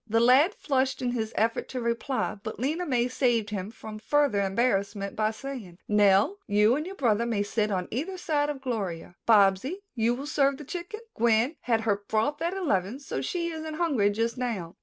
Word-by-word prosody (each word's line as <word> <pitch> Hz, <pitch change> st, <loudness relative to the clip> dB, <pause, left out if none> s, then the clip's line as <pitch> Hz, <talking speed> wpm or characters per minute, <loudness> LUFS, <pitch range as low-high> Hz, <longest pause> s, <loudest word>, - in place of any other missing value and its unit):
The 225 Hz, +1 st, +2 dB
lad 265 Hz, -, +5 dB
flushed 265 Hz, -2 st, 0 dB
in 245 Hz, -, 0 dB
his 225 Hz, -2 st, -2 dB
effort 225 Hz, +1 st, 0 dB
to 255 Hz, -, -4 dB
reply, 235 Hz, +3 st, -1 dB
but 220 Hz, 0 st, -6 dB
Lena 310 Hz, +8 st, -1 dB
May 245 Hz, -3 st, +2 dB
saved 240 Hz, -5 st, +1 dB
him 200 Hz, -1 st, -3 dB
from 220 Hz, -1 st, -9 dB
further 280 Hz, -2 st, +2 dB
embarrassment 200 Hz, -1 st, 0 dB
by 215 Hz, 0 st, +1 dB
saying, 220 Hz, -6 st, -7 dB
"Nell, 210 Hz, -, +4 dB
you 210 Hz, +3 st, +4 dB
and 305 Hz, +4 st, -3 dB
your 385 Hz, -, -7 dB
brother 235 Hz, -, +1 dB
may 215 Hz, -3 st, 0 dB
sit 215 Hz, +1 st, -1 dB
on 185 Hz, -3 st, -1 dB
either 325 Hz, -, -3 dB
side 295 Hz, -4 st, 0 dB
of 275 Hz, -2 st, -5 dB
Gloria. 190 Hz, -9 st, -4 dB
Bobsy, 205 Hz, -, +4 dB, 0.2 s
will 225 Hz, -2 st, 0 dB
you 275 Hz, -, -6 dB
serve 280 Hz, -2 st, +2 dB
the 300 Hz, -, -9 dB
chicken? 355 Hz, +8 st, -6 dB
Gwen 235 Hz, +5 st, +2 dB
had 230 Hz, -2 st, +1 dB
her 215 Hz, -3 st, +1 dB
broth 260 Hz, +8 st, 0 dB
at 340 Hz, +3 st, -1 dB
eleven, 230 Hz, -, 0 dB
so 280 Hz, -, -4 dB
she 340 Hz, -2 st, -2 dB
isn't 315 Hz, -1 st, -5 dB
hungry 285 Hz, -12 st, +2 dB
just 230 Hz, +4 st, -1 dB
now." 195 Hz, -9 st, -3 dB
235 Hz, 195 wpm, -27 LUFS, 210-285 Hz, 0.2 s, lad